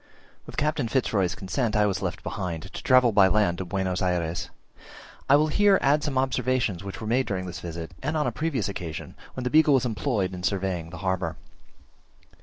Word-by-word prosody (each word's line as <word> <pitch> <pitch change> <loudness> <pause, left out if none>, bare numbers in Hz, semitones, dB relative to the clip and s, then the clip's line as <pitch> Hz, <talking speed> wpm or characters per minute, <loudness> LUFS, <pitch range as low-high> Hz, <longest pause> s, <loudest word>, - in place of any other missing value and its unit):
With - - -10
Captain 145 -4 0
Fitz 130 +1 0
Roy's 95 -4 +1
consent 110 +4 -2
I 105 0 +4
was 95 -3 -1
left - - -4
behind, 85 -4 -4
to 95 - -8
travel 130 -2 +5
by 100 -2 +6
land 95 -3 +2
to 95 - -3
Buenos 95 0 -2
Ayres. 90 -2 -1 0.8
I 140 - +8
will 150 +2 +4
here 200 +4 +4
add 145 +2 +2
some 145 -4 -2
observations, 130 -6 0
which 100 -1 -7
were 110 - -6
made 125 +4 +1
during 95 -2 -2
this 90 0 -6
visit 85 -1 -6
and 155 +4 -1
on 150 - +1
a - - 0
previous 150 - -1
occasion, 85 -6 -6 0.2
when 130 - -4
the 125 - -2
Beagle 155 -2 +5
was 130 - +2
employed 110 -5 -1
in 90 - -6
surveying 95 -3 -1
the 90 - -9
harbour. 95 -3 -1
100 Hz, 205 wpm, -26 LUFS, 90-130 Hz, 0.8 s, I